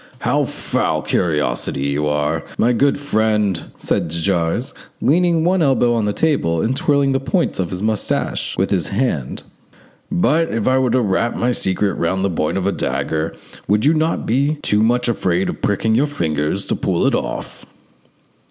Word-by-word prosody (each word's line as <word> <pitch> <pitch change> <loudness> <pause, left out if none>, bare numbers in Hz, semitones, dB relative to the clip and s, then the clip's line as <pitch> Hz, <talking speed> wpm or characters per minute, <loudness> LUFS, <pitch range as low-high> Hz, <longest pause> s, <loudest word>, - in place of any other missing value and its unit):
"How - - +1
full - - -3 0.2
of - - -14
curiosity 75 -4 0
you 75 +1 0
are, 75 +2 0
my 120 +2 +3
good 140 +4 +2
friend!" 110 - 0
said - - -1
de 80 - -4
Jars, 85 +6 -1 0.3
leaning 170 +1 +2
one 180 +1 +2
elbow 130 -5 +3
on 115 -2 0
the 105 - +1
table, 105 - +1
and 120 +9 0
twirling 140 -1 +2
the 135 - +1
points 170 - -1
of 90 -3 -1
his 90 +2 -5
moustache 110 -1 -1
with 95 +2 0
his 95 -4 +1
hand; 100 - -2 0.7
"but 160 - +2
if 115 -2 -2
I 130 0 +3
were 130 -1 +1
to 130 - +2
wrap 115 +2 0
my 125 +1 +1
secret 95 -3 0
round 95 +3 0
the 100 - 0
point 85 +2 -1
of 95 - -2
a 100 - +2
dagger 80 -3 -2 0.3
would 105 +5 +2
you 150 - +5
not 160 +1 0
be 140 +6 +1
too 105 0 +2
much 120 +2 +2
afraid 95 -5 0
of - - -6
pricking 105 +2 +1
your 135 +6 +3
fingers 80 - -1
to - - -1
pull - - 0
it - - +3
off?" - - -4
105 Hz, 185 wpm, -19 LUFS, 85-135 Hz, 0.7 s, you